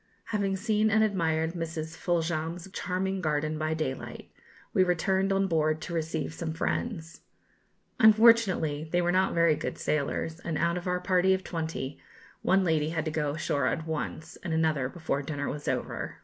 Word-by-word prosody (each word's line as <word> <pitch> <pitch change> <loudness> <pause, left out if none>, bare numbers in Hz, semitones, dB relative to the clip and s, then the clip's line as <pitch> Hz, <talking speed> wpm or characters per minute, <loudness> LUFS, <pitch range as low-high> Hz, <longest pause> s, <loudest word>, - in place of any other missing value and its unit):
Having 200 -2 +1
seen 215 +1 +2
and 220 0 +4
admired 165 -5 +1
Mrs. 160 -2 -4
Foljambe's 170 0 -1
charming 190 +1 -2
garden 155 -1 -1
by 155 0 0
daylight, 135 -5 -5 0.4
we 185 - +5
returned 190 +2 +1
on 195 0 +2
board 155 -3 +1
to 170 - -6
receive 160 -1 -2
some 165 -1 -4
friends. 165 -1 -3 0.8
Unfortunately 215 -9 +5
they 175 - +2
were 175 0 +2
not 190 +1 +2
very 170 -1 +5
good - - -4
sailors, 155 +2 -1
and, 165 -3 -3
out 170 +1 +1
of 180 +1 -4
our 180 0 +1
party 185 +1 +3
of 190 - -5
twenty, 160 -6 -4 0.4
one 190 0 +3
lady 160 -3 +1
had 160 -1 -2
to 155 - -1
go 150 -2 -1
ashore 140 -4 0
at 160 - -1
once, 160 0 -4
and 170 -3 -3
another 155 -5 +1
before 155 -3 -2
dinner 145 0 -3
was 145 0 -5
over. - - -3
165 Hz, 170 wpm, -28 LUFS, 155-185 Hz, 0.8 s, we